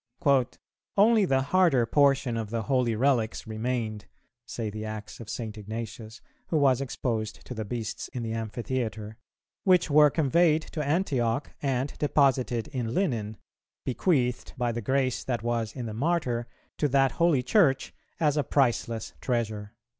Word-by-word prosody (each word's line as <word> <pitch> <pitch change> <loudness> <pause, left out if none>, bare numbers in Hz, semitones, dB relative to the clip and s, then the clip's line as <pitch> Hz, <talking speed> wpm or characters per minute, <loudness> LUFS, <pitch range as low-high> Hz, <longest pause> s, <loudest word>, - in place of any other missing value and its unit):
"Only 215 0 +5
the 135 -5 +2
harder 145 -5 +3
portion 135 -1 +3
of 110 -2 -3
the 115 0 -2
holy 125 -2 +1
relics 120 -2 +1
remained," 110 -1 -3 0.4
say 110 -3 -4
the 110 +1 -6
Acts 110 -1 -7
of 115 -2 -9
St. 110 -3 -5
Ignatius, 110 +1 -7 0.3
who 160 - 0
was 135 -3 +3
exposed 115 -4 -3
to - - -6
the 110 -2 -4
beasts 110 0 -4
in 125 - -5
the 110 -1 -3
amphitheatre, 115 -1 -4 0.5
"which 180 -4 +3
were 150 0 +7
conveyed 160 +2 +3
to 155 - -2
Antioch, 140 -6 0
and 135 0 -1
deposited 135 -5 +2
in 120 -3 -3
linen, 115 - -1 0.5
bequeathed, 125 - 0
by 120 -1 0
the 120 +1 -4
grace 130 +2 0
that 120 -3 -2
was 115 -2 -1
in 125 -3 -4
the 110 - -5
Martyr, 125 -3 0 0.3
to 150 - +3
that 135 -1 +3
holy 155 -2 +2
Church 145 - +2 0.3
as 150 -2 +2
a 145 - +2
priceless 120 -5 0
treasure." 110 -3 -2
125 Hz, 150 wpm, -27 LUFS, 115-140 Hz, 0.5 s, were